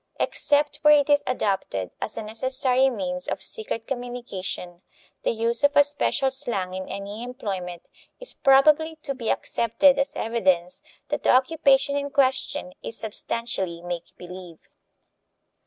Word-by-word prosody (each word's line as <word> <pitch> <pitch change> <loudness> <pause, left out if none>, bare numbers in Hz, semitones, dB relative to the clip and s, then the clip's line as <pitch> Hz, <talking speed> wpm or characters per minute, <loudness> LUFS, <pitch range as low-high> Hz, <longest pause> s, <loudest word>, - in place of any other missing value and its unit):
Except 290 0 +1
where 300 -1 +6
it 285 - -2
is 290 0 +4
adopted 195 - -2
as - - -2
a - - -3
necessary 260 +4 +2
means 180 -6 -4
of - - -1
secret 415 - -1
communication, 235 -9 -5 0.4
the - - 0
use 230 +3 +1
of 285 +1 +3
a 290 - +9
special 280 -2 +1
slang 235 -9 -2
in 190 0 -6
any 200 +2 -6
employment 195 -8 -5 0.4
is - - -2
probably 305 +4 +4
to 275 - -2
be 240 -4 -4
accepted 265 +5 +2
as 275 - -1
evidence 185 -6 0 0.3
that - - -2
the - - 0
occupation 280 +1 +3
in 285 0 -2
question 265 -9 0
is 230 - -5
substantially 205 -5 -3
make 175 -1 -6
believe. 180 -2 -10
240 Hz, 140 wpm, -24 LUFS, 190-275 Hz, 0.4 s, a